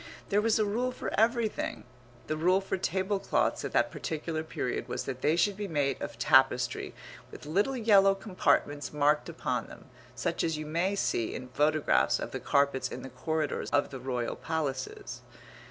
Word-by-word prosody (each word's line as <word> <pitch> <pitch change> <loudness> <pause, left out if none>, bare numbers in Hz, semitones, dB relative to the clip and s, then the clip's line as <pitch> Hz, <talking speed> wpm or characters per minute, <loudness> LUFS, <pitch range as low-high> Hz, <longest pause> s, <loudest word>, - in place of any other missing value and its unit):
There 205 +1 +3
was 225 0 +3
a 215 - +2
rule 240 +5 0
for 250 - -5
everything. 225 0 +1 0.4
The 155 - -2
rule 180 +4 +3
for 195 - -3
tablecloths 190 +2 0
at - - -3
that - - +2
particular 160 0 -3
period 155 -5 -3
was - - -3
that 130 -1 -5
they 150 +2 +3
should 195 +4 +2
be 205 0 -4
made 145 -5 0
of - - -5
tapestry 130 -3 +3 0.3
with - - -11
little 200 - +1
yellow 200 -4 +5
compartments 180 -7 0
marked 150 0 +2
upon - - -2
them, - - -14 0.2
such - - -1
as 165 -2 0
you 155 - -5
may 170 +6 0
see 115 - -1
in 125 0 -7
photographs 150 +3 +2
of - - -5
the - - -4
carpets 140 -1 +1
in - - -7
the 135 - -7
corridors 155 +4 -2
of 145 - +1
the 135 - -6
royal 125 -2 -2
palaces. 145 -5 -4
160 Hz, 175 wpm, -30 LUFS, 140-195 Hz, 0.4 s, yellow